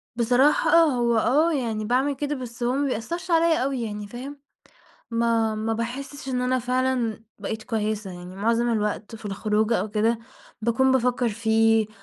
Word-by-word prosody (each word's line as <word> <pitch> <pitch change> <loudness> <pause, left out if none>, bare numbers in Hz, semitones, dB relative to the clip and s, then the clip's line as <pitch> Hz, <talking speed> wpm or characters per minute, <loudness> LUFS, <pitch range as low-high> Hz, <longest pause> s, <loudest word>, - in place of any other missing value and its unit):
بصراحة 250 +5 +3
آه، 335 0 +7
هو 240 -5 +1
آه 295 +9 +3
يعني 225 -6 -2
باعمل 260 +5 +1
كده 295 +1 -2
بس 245 -2 -7
هو 245 +1 +1
ما 280 +1 0
بيأثرش 275 +9 -4
عليَّ 330 -3 +3
أوي 265 -2 -1
يعني، 210 -2 -5
فاهم؟ 265 +6 -8 0.7
ما 230 -1 +1
ما 220 +1 -1
باحسش 265 +5 -5
إن 250 -1 -1
أنا 255 +1 +1
فعلًا 250 -3 -1 0.2
بقيت 220 +2 -4
كويسة، 215 -3 -2
يعني 180 +1 -10
مُعظم 230 +4 +1
الوقت 210 0 -2
في 225 - -12
الخروجة 210 +2 0
أو 215 - -3
كده 220 +2 +1 0.4
باكون 245 +4 +2
بافكر 250 -1 +2
فيه، 225 0 +2
235 Hz, 165 wpm, -24 LUFS, 220-260 Hz, 0.7 s, آه